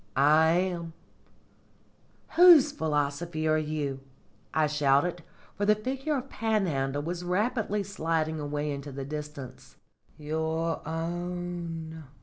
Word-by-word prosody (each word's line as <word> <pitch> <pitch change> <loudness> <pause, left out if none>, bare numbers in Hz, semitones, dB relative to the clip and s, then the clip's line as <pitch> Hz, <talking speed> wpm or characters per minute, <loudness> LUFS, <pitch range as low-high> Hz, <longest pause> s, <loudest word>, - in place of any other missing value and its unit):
"I 155 +4 +5
am." 175 -2 -1 1.4
"Whose 335 -4 +8
philosophy 155 - -1
are 155 0 +3
you?" 150 -3 -3 0.5
I 155 -1 +2
shouted, 150 +3 +2 0.3
for 205 - -3
the 210 - +6
figure 270 +7 -2
of 260 +1 -5
Panhandle 165 - -1
was 175 +2 -4
rapidly 210 +3 0
sliding 160 -4 -1
away 150 0 -2
into 140 0 -6
the 135 0 -5
distance. 150 -3 -8 0.4
"Your 160 +2 -2
own!" 170 -1 -4
160 Hz, 110 wpm, -28 LUFS, 150-180 Hz, 1.4 s, Whose